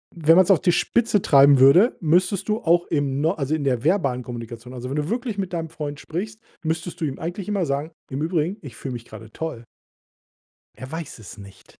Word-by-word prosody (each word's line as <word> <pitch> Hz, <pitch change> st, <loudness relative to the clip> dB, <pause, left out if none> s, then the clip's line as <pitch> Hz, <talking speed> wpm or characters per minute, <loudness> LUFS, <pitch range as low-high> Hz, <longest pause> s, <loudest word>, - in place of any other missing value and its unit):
wenn 165 Hz, 0 st, +4 dB
man's 185 Hz, +1 st, +5 dB
auf 190 Hz, -, +6 dB
die 175 Hz, -, +3 dB
Spitze 220 Hz, +1 st, +1 dB
treiben 140 Hz, -1 st, +6 dB
würde, 170 Hz, -, +6 dB
müsstest 180 Hz, +5 st, +1 dB
du 215 Hz, -, +2 dB
auch 170 Hz, +1 st, +2 dB
im 145 Hz, -2 st, -1 dB
No 160 Hz, +2 st, +2 dB
also, 150 Hz, -4 st, -2 dB
in 155 Hz, -, -1 dB
der 125 Hz, -4 st, 0 dB
verbalen 140 Hz, -8 st, +1 dB
Kommunikation 120 Hz, 0 st, -8 dB
also, 125 Hz, 0 st, -6 dB
wenn 140 Hz, -, -3 dB
du 150 Hz, +1 st, -2 dB
wirklich 235 Hz, -3 st, -3 dB
mit 190 Hz, -2 st, -3 dB
deinem 165 Hz, -1 st, -3 dB
Freund 150 Hz, -3 st, -6 dB
sprichst, 210 Hz, +7 st, -6 dB, 0.2 s
müsstest 165 Hz, +2 st, -3 dB
du 160 Hz, -, -1 dB
ihm 135 Hz, -3 st, -4 dB
eigentlich 175 Hz, +4 st, -5 dB
immer 200 Hz, -4 st, 0 dB
sagen: 140 Hz, +3 st, -2 dB, 0.2 s
„Im 135 Hz, +2 st, -4 dB
Übrigen, 170 Hz, +4 st, -1 dB
ich 135 Hz, -8 st, -10 dB
fühle 130 Hz, -2 st, -6 dB
mich 120 Hz, -1 st, -7 dB
grade 110 Hz, 0 st, -12 dB
toll.“ 140 Hz, -7 st, -6 dB, 1.1 s
Er 130 Hz, +3 st, -10 dB
weiß 160 Hz, -6 st, -6 dB
es 105 Hz, -1 st, -11 dB
nicht. 100 Hz, -1 st, -14 dB
155 Hz, 215 wpm, -23 LUFS, 135-175 Hz, 1.1 s, auf